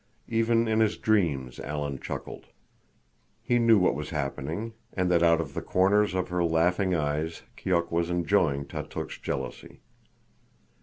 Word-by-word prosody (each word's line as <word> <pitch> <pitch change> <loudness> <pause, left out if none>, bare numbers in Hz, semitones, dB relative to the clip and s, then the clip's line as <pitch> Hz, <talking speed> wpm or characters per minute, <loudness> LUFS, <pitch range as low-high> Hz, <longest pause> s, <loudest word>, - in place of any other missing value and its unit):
Even 115 0 +2
in 110 0 +2
his 110 -1 +2
dreams 75 - 0
Alan 75 -2 -4
chuckled. - - -7 1.0
He 120 0 +2
knew 115 -2 +6
what 90 - +3
was 75 +1 -5
happening, 75 - -3 0.2
and 90 -1 0
that 85 -1 +4
out 85 -1 +5
of 75 -4 -4
the - - -3
corners 100 +1 +2
of 90 -1 -1
her 90 -1 0
laughing 90 +3 +2
eyes 75 +1 -2
Keok 85 -2 0
was 85 0 0
enjoying 85 -5 +1
Tautuk's - - -6
jealousy. - - -5
85 Hz, 145 wpm, -27 LUFS, 75-105 Hz, 1.0 s, knew